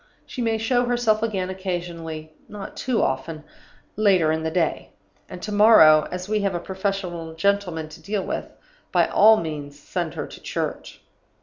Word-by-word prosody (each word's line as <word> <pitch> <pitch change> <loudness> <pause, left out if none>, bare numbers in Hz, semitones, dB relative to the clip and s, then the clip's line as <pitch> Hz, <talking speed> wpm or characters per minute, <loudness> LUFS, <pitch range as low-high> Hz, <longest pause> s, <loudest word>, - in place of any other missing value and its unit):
She 255 - -6
may 225 -1 +1
show 245 +3 +1
herself 240 -3 +1
again 195 -5 -1
occasionally 170 -4 -5 0.2
(not 205 -2 -8
too 250 -3 0
often) 150 +4 -2 0.5
later 190 -7 +3
in 160 0 -1
the 160 - -1
day. 165 -1 -1 0.4
And 180 - -9
to 210 - -4
morrow 205 -8 +7
as 180 +1 -5
we 215 0 0
have 195 -3 -1
a - - -1
professional 185 -3 -4
gentleman 180 -3 0
to - - -13
deal 200 -1 -2
with - - -3 0.4
by - - +4
all 220 +1 +6
means 150 -5 -5
send 145 - -4
her - - -3
to - - -12
church. - - -5
185 Hz, 170 wpm, -23 LUFS, 160-210 Hz, 0.5 s, morrow